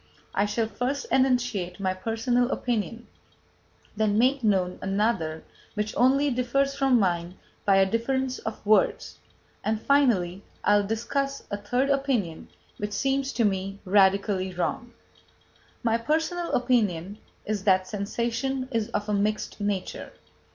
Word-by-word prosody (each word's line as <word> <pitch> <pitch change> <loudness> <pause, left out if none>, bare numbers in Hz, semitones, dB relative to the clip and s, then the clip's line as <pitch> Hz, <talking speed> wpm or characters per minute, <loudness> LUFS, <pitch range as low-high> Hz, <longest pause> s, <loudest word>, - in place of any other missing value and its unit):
I 200 +1 +2
shall 225 +2 0
first 255 +5 -3
enunciate 245 -9 +1
my 190 -1 0
personal 230 +5 0
opinion, 235 -2 -2 0.9
then 210 -1 +1
make 260 +3 +3
known 185 -4 +1
another 195 -5 0 0.3
which 210 0 -2
only 275 +3 +3
differs 260 +3 +1
from 270 -2 +3
mine 175 -2 -1 0.3
by 200 -2 +5
a 195 0 +5
difference 255 +5 -1
of 220 -1 -6
words, 215 +1 +2 0.4
and 215 0 0
finally 210 -9 +2 0.2
I 205 - +5
will 205 -1 0
discuss 275 +5 -2
a 205 - -1
third 245 +7 0
opinion, 255 - -1 0.3
which 205 0 -4
seems 270 +5 0
to 230 - +2
me 195 0 -1
radically 195 0 +3
wrong. 240 +7 -2 0.9
My 230 -1 +2
personal 320 +6 -1
opinion 210 -7 +1 0.3
is 210 -2 -2
that 185 -2 +4
sensation 235 +6 -2
is 225 -3 -1
of 205 0 -6
a 210 - 0
mixed 210 +2 -1
nature. 200 -2 -3
220 Hz, 135 wpm, -26 LUFS, 195-255 Hz, 0.9 s, by